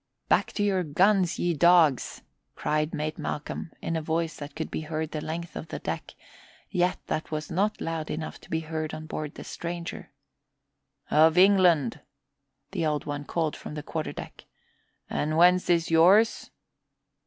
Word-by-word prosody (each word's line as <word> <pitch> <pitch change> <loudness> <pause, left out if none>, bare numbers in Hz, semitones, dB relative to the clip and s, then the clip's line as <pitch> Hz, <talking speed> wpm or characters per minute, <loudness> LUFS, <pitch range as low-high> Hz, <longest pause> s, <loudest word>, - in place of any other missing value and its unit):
"Back - - +3
to 205 - 0
your 195 -2 +2
guns, 180 +3 +3
ye 175 0 +1
dogs!" 165 -4 +4 0.3
cried 150 +1 0
Mate 155 +1 -3
Malcolm 150 +2 -4
in 165 - -1
a 160 - -1
voice 160 +1 -1
that 145 -1 -8
could 160 0 -4
be - - -3
heard 155 0 -3
the 155 - -3
length 165 +2 -5
of - - -6
the - - -5
deck, - - -5 0.6
yet 180 -1 +1
that 155 - -3
was 155 -1 -4
not 200 +5 0
loud 165 -1 -3
enough 155 +1 -5
to - - -17
be 160 - -1
heard 155 -1 -4
on 155 - -8
board 155 -1 -5
the - - -8
stranger. 170 0 -6 1.0
"Of 160 +2 +5
England," 180 - +5 0.7
the - - -2
Old 150 -2 0
One 145 0 -4
called 160 -1 -1
from - - -8
the 150 - -5
quarter 155 0 -3
deck. - - -9 0.6
"And 155 +1 -1
whence 180 +2 +5
is 170 -1 +2
yours?" 190 +8 +5
160 Hz, 165 wpm, -27 LUFS, 155-175 Hz, 1.0 s, Of